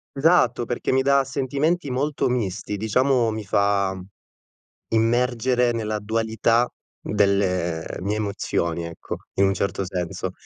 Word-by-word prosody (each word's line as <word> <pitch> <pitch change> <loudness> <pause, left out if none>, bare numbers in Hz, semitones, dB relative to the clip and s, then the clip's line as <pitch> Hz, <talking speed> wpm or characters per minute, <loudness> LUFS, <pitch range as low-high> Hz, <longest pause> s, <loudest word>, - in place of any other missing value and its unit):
Esatto, 135 -6 +3
perché 120 - -2
mi 130 0 +3
da 140 0 +4
sentimenti 140 +4 -1
molto 140 +1 0
misti, 105 -4 -2
diciamo 120 +3 +2
mi 110 -1 -4
fa 100 -1 +1 1.0
immergere 120 +1 +2
nella 110 -2 -2
dualità 115 +2 +1 0.3
delle 95 -5 +1
mie 100 +4 -1
emozioni, 85 -5 -2
ecco, 85 -1 -6 0.2
in 100 - +2
un 95 - +2
certo 100 0 -2
senso. 90 0 -3
110 Hz, 120 wpm, -23 LUFS, 100-125 Hz, 1.0 s, da